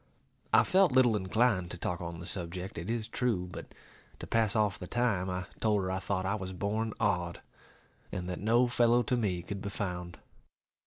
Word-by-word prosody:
I - - +7
felt 190 -4 +4
little 125 -3 +5
inclined 100 -1 +1
to 90 - -6
talk 85 0 -3
on 85 -1 -5
the 85 - -7
subject, 90 0 -5
it 85 - -6
is 115 -2 -1
true; 110 -8 0
but, - - -8 0.5
to - - -7
pass 115 -2 +1
off 105 -3 +2
the 90 - -6
time, 115 -6 +1
I 90 0 -3
told 105 -3 +2
her 95 - -1
I 95 - -1
thought 95 -1 -2
I 100 - +1
was 95 -3 -4
born 105 +4 -2
odd, 90 -5 0 0.7
and 90 -1 -4
that 90 - -4
no 120 +4 +4
fellow 120 0 +4
to 125 - +1
me 95 -7 -1
could 100 +2 -5
be 100 - -3
found. 90 -4 -4
100 Hz, 200 wpm, -31 LUFS, 90-115 Hz, 0.7 s, I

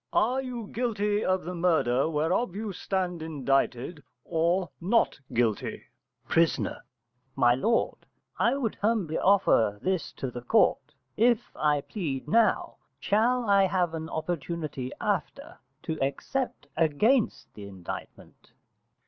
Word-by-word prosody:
_ - - -60
Are 255 +4 +2
you 245 -4 -5
guilty 210 -2 -1
of 185 0 +1
the 180 +3 -5
murder 160 -6 +2
whereof 170 +7 0
you 210 -1 -4
stand 180 -2 -2
indicted, 140 -1 -1 0.2
or 170 +2 +1
not 205 -2 +2
guilty? 115 -3 0 0.4
Pris. 165 0 +3 0.8
My 120 -2 +5
lord, 225 - +1 0.4
I 240 - +3
would 235 -6 -1
humbly 205 -7 +1
offer 185 - +3
this 185 - -1
to 130 - -5
the 120 - -6
court. 120 - +2 0.2
If 235 +1 +2
I 150 -1 +2
plead 145 -7 -4
now, 225 +7 +2 0.2
shall 235 +3 +2
I 200 -1 +5
have 180 -3 0
an 160 0 -5
opportunity 160 -4 -4
after - - -3 0.2
to 160 - -3
except 245 - -2
against 205 - +1
the 100 -1 -9
indictment? 95 -3 -9
175 Hz, 125 wpm, -28 LUFS, 145-210 Hz, 0.8 s, My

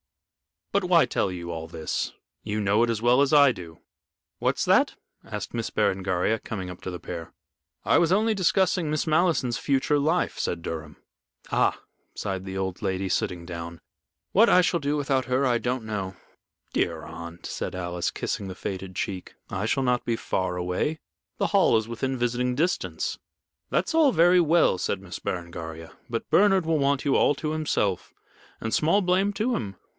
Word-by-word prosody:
But 200 -1 +1
why 175 -2 +5
tell 95 - -1
you 85 -1 -5
all 80 -1 -5
this 80 -1 -3 0.3
you 105 0 -2
know 100 +2 +3
it 120 - +3
as 115 -2 -1
well 125 +3 +5
as 140 +1 +2
I 145 -2 +7
do." 85 -7 -10 0.6
"What's - - +1
that?" - - +4 0.3
asked - - -6
Miss - - -2
Berengaria, 95 +3 +1
coming 95 -4 -5
up 90 - -11
to - - -5
the 90 -1 -6
pair. 85 -2 -7 0.5
"I - - +4
was 170 0 +2
only 215 +3 +3
discussing 185 -3 +2
Miss 155 0 0
Malleson's 155 -7 +2
future 140 +1 +1
life," 160 +5 0
said 85 - -2
Durham. 80 -2 -5 0.6
"Ah," - - +2 0.4
sighed 95 -1 -3
the 95 0 -5
old 95 0 -3
lady, 95 -1 -1
sitting 85 -1 -1
down. 85 -1 -7 0.5
"What 225 +4 +5
I 180 - +6
shall 175 -1 +1
do 145 0 -1
without 135 -2 0
her 130 +2 +1
I 120 -2 +3
don't 125 0 -2
know." 100 -4 -4 0.6
"Dear - - 0
aunt," 85 0 -9
said - - -4
Alice, 90 -1 -2
kissing 100 - -3
the 95 - -6
faded 95 0 -5
cheek, 95 -2 -4 0.2
"I 95 +3 -2
shall 135 +4 +1
not 125 -1 +1
be 115 - +1
far 95 -4 -2
away. 90 - -1 0.4
The - - +1
Hall - - +4
is 110 +1 -2
within 130 +3 -2
visiting 125 +1 0
distance." 170 +6 -1 0.5
"That's - - 0
all 310 -5 +5
very 175 +2 +5
well," 165 - +4
said - - -1
Miss 95 -2 -7
Berengaria. 85 -2 -5 0.2
"But 115 -1 -3
Bernard 195 -3 +5
will 160 -1 +1
want 140 -1 +1
you 140 - +3
all 145 - +4
to 150 +2 -3
himself, 125 - -1 0.5
and 115 - -3
small 165 +7 +3
blame 190 +2 +2
to 225 +5 0
him. 100 -4 -4
120 Hz, 180 wpm, -26 LUFS, 95-155 Hz, 0.6 s, I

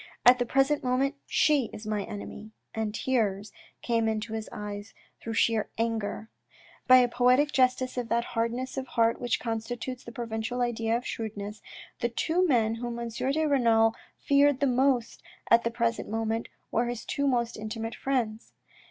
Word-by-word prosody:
At 250 +1 +8
the 245 - 0
present 270 +3 +2
moment 260 +2 +1
she 285 -7 +3
is 210 - -9
my 215 -1 -1
enemy," 210 +2 -8 0.2
and 220 -1 -2
tears 215 -6 0 0.3
came 230 -2 +1
into 220 0 -2
his 220 -1 -4
eyes 205 0 -7 0.3
through 225 0 -4
sheer 225 -1 +2
anger. 225 -1 -2 0.6
By 255 - +9
a 250 -1 +5
poetic 250 +4 +3
justice 255 -1 +2
for 250 - -1
that 235 0 0
hardness 240 +3 -2
of 265 0 -3
heart 230 -1 +1
which 245 -2 0
constitutes 235 +2 -4
the 235 - -9
provincial 230 +1 -4
idea 230 -1 0
of 245 - -8
shrewdness, 210 -1 -5 0.4
the 240 - 0
two 335 +9 +1
men 225 -6 +3
whom 240 -1 -4
M. 235 0 -4
de 275 +7 0
Renal 230 -6 +4 0.2
feared 280 -1 +3
the 285 - +2
most 255 -2 +1 0.3
at 230 0 +6
the 235 - +1
present 235 0 -1
moment 225 +1 -1 0.2
were 235 +1 +1
his 240 -1 -4
two 280 0 -1
most 240 -3 +1
intimate 225 +1 -5
friends. 235 -5 -2
235 Hz, 170 wpm, -28 LUFS, 225-255 Hz, 0.6 s, By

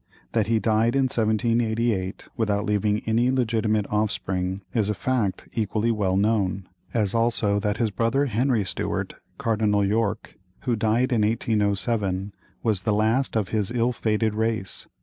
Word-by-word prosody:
That 110 -3 +1
he 115 0 +2
died 110 +2 +2
in 135 - +3
1788, 115 -3 0
without 105 -2 0
leaving 105 0 +1
any 115 +3 +2
legitimate 110 -4 +1
offspring, 95 -3 -1
is 110 -4 +1
a 105 - 0
fact 110 -1 -1
equally 110 +1 0
well 100 -4 0
known; 100 -3 +1 0.2
as 105 -4 +1
also 115 -3 +2
that 105 0 -1
his 115 -3 0
brother 115 +7 +1
Henry 120 -2 +1
Stuart, - - -2 0.2
Cardinal 105 -2 +1
York, 105 +1 -1 0.2
who 125 -3 0
died 115 +4 +1
in 115 - +2
1807, 105 -2 0 0.3
was 110 -5 +1
the 105 +2 0
last 110 +6 +1
of 105 -4 -1
his 105 -3 -1
ill 120 0 +1
fated 110 -2 0
race. 110 -3 -2
110 Hz, 150 wpm, -24 LUFS, 105-115 Hz, 0.3 s, in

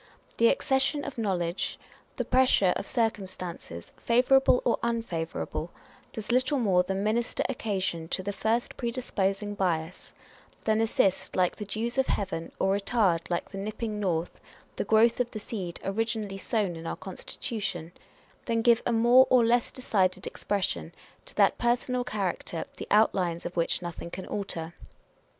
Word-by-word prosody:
The 230 - +5
accession 270 +3 +1
of 270 -4 -6
knowledge, 180 -4 -1 0.4
the - - -1
pressure 250 -8 +4
of - - -4
circumstances, 185 - -3
favourable 250 +2 +4
or 235 - +2
unfavourable, 225 -9 -2 0.4
does 220 -1 -5
little 255 +4 +2
more 195 -8 +3
than 190 +2 -2
minister 230 +3 0
occasion 190 -9 -2
to 185 - -2
the 205 +1 -3
first 230 +4 -1
predisposing 205 -5 -1
bias 175 -3 -2
â€" - - -27
than 220 0 +2
assist, 200 -4 +1
like 180 -1 +2
the 210 - -5
dews 230 +5 -2
of 265 - +2
heaven, 190 -5 -2
or 195 +1 +2
retard, 200 -5 +1
like 175 0 -2
the 195 - -6
nipping 215 +1 -4
north, 175 -4 -2 0.3
the - - -1
growth 225 +2 +4
of 245 -1 +1
the 220 - -7
seed 195 -5 -5
originally 210 0 -2
sown 200 -5 -1
in 165 0 -7
our - - -2
constitution 190 -3 -5 0.5
â€" - - -34
than 230 -2 0
give 235 -1 +5
a - - +2
more 240 +3 +6
or 250 -2 +5
less 235 +1 +3
decided 190 -7 0
expression 85 - -2 0.3
to - - -10
that - - +4
personal 245 +1 +1
character 190 -6 -3
the - - -6
outlines 185 -5 +2
of 175 - -5
which 170 +1 0
nothing 170 0 -6
can 185 +2 -7
alter. 170 -5 -4
205 Hz, 155 wpm, -28 LUFS, 185-235 Hz, 0.5 s, more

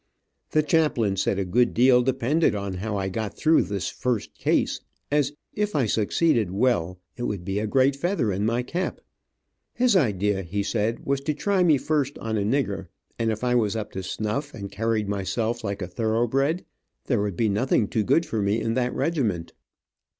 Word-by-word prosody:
The 155 - +2
chaplain 150 - +2
said 95 0 0
a 100 - -1
good 120 +7 +2
deal 125 +1 +6
depended 130 +3 +1
on 100 -1 -3
how 100 +3 -3
I 95 -1 -1
got 105 +2 -4
through 160 +1 +4
this 100 -4 -3
first 125 -4 -2
case, - - 0 0.3
as 145 -1 +2 0.2
if 210 -2 -1
I 135 -4 +3
succeeded 110 - +2
well, 95 -4 0 0.2
it 120 - -3
would 95 -4 -3
be 95 +1 -1
a 110 - -1
great 135 +5 +3
feather 155 - 0
in 95 +2 -1
my 115 +3 +1
cap. 175 +8 -3 0.8
His 245 -3 +3
idea, 105 - +2
he 100 +3 -2
said, 110 +2 -1
was 140 0 0
to 150 +1 -2
try 195 +4 +1
me 160 -5 +5
first 145 -1 -1
on 110 -1 -3
a 105 - +1
nigger, 100 -4 -1 0.3
and 115 -1 +1
if 110 +2 -4
I 125 0 +2
was 110 -4 +2
up 110 -2 -4
to 95 - -4
snuff, 110 +9 -3
and 100 -4 -7
carried 115 -1 -1
myself 110 +4 -2
like 100 -2 -3
a - - -4
thoroughbred, 120 - 0 0.4
there 120 -6 +1
would 100 -4 -2
be 115 - +2
nothing 105 +1 +1
too 110 - 0
good 165 - +3
for 110 - -2
me 100 +3 +1
in 115 0 -1
that 125 0 0
regiment. 130 - -1
115 Hz, 195 wpm, -25 LUFS, 100-135 Hz, 0.8 s, deal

